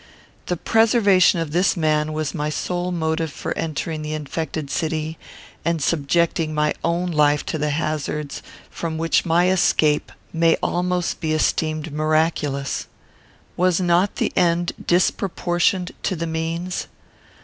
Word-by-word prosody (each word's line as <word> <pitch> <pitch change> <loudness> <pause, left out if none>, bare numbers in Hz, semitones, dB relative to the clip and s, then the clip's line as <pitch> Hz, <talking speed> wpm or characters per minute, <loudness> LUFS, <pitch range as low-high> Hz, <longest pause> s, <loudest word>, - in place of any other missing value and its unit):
The 180 - -1
preservation 210 -4 +4
of 160 -3 -4
this 180 +3 +2
man 155 -1 +1
was 155 -1 -2
my 150 -3 -2
sole 175 +4 -2
motive 160 -2 -1
for - - -4
entering 155 0 -3
the 155 0 -3
infected 155 -1 -4
city, 160 0 -2 0.4
and 170 -1 0
subjecting 160 +1 +1
my 150 0 +2
own 170 +2 0
life 150 -2 +3
to 160 - -3
the 150 +1 0
hazards 150 -1 -2 0.3
from 160 -1 -4
which 165 +3 +1
my 170 +2 +3
escape 155 -5 +2 0.2
may 165 0 +3
almost 180 0 0
be 155 -2 -1
esteemed 155 0 0
miraculous. 155 -2 0 0.7
Was 180 0 +2
not 180 +2 +2
the - - -1
end 175 0 +2 0.2
disproportioned 180 0 +1
to 190 - -1
the 165 0 -3
means? 165 +3 -3
165 Hz, 135 wpm, -22 LUFS, 155-175 Hz, 0.7 s, preservation